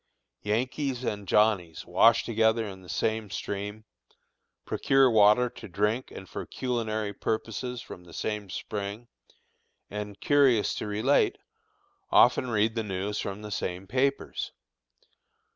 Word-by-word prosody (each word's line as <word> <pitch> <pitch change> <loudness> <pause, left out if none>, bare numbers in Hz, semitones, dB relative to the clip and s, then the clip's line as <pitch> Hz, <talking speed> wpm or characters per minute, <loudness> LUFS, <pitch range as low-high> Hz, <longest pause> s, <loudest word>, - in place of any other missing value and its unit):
Yankees 125 +4 -1
and 105 -4 -3
Johnnies 100 -6 +2
wash 115 0 +5
together 110 0 +2
in 95 -1 -9
the 90 - -14
same 110 -1 -1
stream, 105 +2 -5 0.8
procure 135 -2 +3
water 105 +3 +6
to - - -10
drink 105 +6 0
and 95 - -10
for - - -6
culinary 110 -4 -2
purposes 115 +4 -3
from 90 - -10
the 85 - -14
same 105 0 -3
spring, 105 +4 -5 0.8
and, 105 -1 -6
curious 135 -7 +4
to - - -4
relate, 110 +7 +2 0.7
often 130 - +5
read 110 0 +2
the 115 - -1
news 100 0 -3
from 100 +2 -4
the 105 - -7
same 90 -1 -3
papers. 135 +5 -1
110 Hz, 125 wpm, -28 LUFS, 100-120 Hz, 0.8 s, water